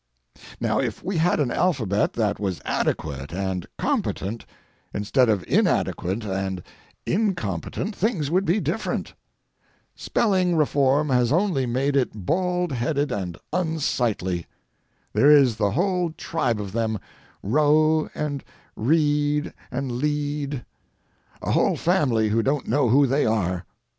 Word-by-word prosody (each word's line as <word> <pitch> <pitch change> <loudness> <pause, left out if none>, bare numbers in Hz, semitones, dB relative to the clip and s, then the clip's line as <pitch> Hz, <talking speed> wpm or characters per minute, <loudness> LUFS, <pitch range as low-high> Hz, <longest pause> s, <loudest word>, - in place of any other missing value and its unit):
Now, - - +1
if - - -2
we 190 -2 -2
had 165 +1 +2
an 135 -5 +1
alphabet 115 - +1
that 105 -3 0
was 95 -4 -2
adequate 70 -1 -2
and 95 -1 -3
competent, 110 +4 -2 0.5
instead 115 +5 +2
of 100 -4 +1
inadequate 100 +6 +1
and 95 -2 -3 0.4
incompetent, 185 - -1
things 180 - 0
would 185 +3 +3
be 195 +3 +2
different. - - -2 0.8
Spelling 185 -5 +1
reform 145 -1 +2
has 125 -2 +2
only 165 -6 +1
made 135 +4 0
it 110 -8 -1
bald 180 - 0
headed 140 +3 -1
and 90 -5 -3 0.2
unsightly. 125 - -1 0.7
There 140 - +5
is 135 -6 +6
the 105 -2 +2
whole 180 - +1
tribe 160 - -1
of 100 -2 -5
them, 110 0 -1 0.5
"row" 155 +6 +3
and 145 -2 -3 0.3
"read" 150 +3 +1 0.2
and 130 0 -3
"lead"—a 145 -1 -5
whole - - +2
family 130 - +2
who 115 +2 +2
don't 135 +3 -1
know 130 0 +2
who 140 +5 +5
they 135 +1 +2
are. 95 -5 0
135 Hz, 125 wpm, -24 LUFS, 105-155 Hz, 0.8 s, is